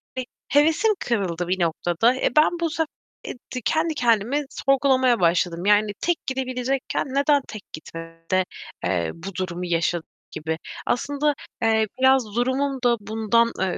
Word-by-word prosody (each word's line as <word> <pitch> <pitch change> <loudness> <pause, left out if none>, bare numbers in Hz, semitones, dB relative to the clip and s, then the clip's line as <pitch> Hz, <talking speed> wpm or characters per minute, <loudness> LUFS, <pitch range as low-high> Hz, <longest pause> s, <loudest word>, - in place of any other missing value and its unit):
hani, 255 - -3 0.2
hevesim 320 - +4
kırıldı 180 -7 -1
bir 185 +1 0
noktada. 175 +7 +2
Eee, - - +1
ben 325 +3 +4
bu 335 - +1
sefer, 320 0 -1 0.4
eee, - - -4 0.2
de 250 - -3
kendi 320 0 +1
kendimi 240 +4 +1
sorgulamaya 260 -3 +2
başladım. 170 +1 +1
Yani 210 0 +4
tek 345 -1 +1
gidebilecekken 260 0 -2
neden 280 +1 +2
tek 215 -2 -8
gitmedim 165 +1 -9
de, 185 0 +3 0.4
eee, 85 -3 0
bu 175 +2 -8
durumu 180 -1 -3
yaşadım 170 -1 0 0.2
gibi. 160 +1 -3 0.3
Aslında, 285 +4 0 0.3
eee, 220 -1 +3
biraz 260 -5 +3
durumum 260 +2 0
da 240 -1 +3
bundan, 225 +2 +1
ııı, 190 -2 0
235 Hz, 150 wpm, -23 LUFS, 180-275 Hz, 0.4 s, hevesim